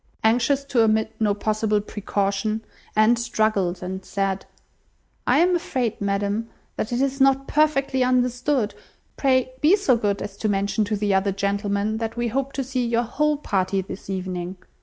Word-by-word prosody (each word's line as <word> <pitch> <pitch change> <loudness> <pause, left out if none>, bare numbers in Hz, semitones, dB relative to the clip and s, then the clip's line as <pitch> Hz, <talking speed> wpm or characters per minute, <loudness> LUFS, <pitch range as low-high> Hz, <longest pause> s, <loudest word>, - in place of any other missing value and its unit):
Anxious 245 +5 +3
to 260 -4 +1
omit 220 0 +2
no 210 -2 +2
possible 215 0 0
precaution, 205 +1 -2 0.3
Anne 215 +3 +5
struggled, 215 -6 0
and 190 +1 -5
said— 195 0 -2 0.8
"I - - +4
am 355 +2 +4
afraid, 255 - -2
ma'am, 200 +3 -1 0.3
that 215 - -3
it 240 - 0
is 275 0 0
not 270 0 +4
perfectly 275 -3 +2
understood. 250 -1 +1 0.4
Pray 260 -2 +2
be 320 +6 +6
so 380 -12 +3
good 205 -3 -1
as 200 -1 -7
to 215 - -1
mention 200 +2 +1
to 210 +1 -1
the 205 -1 0
other 190 +1 +2
gentlemen 200 +2 -1
that 225 0 -4
we 240 0 0
hope 270 +3 -1
to 270 - -2
see 255 -1 -2
your 235 0 +1
whole 300 +5 0
party 195 -7 0
this 190 +1 -9
evening. 185 -1 -4
220 Hz, 165 wpm, -23 LUFS, 200-255 Hz, 0.8 s, be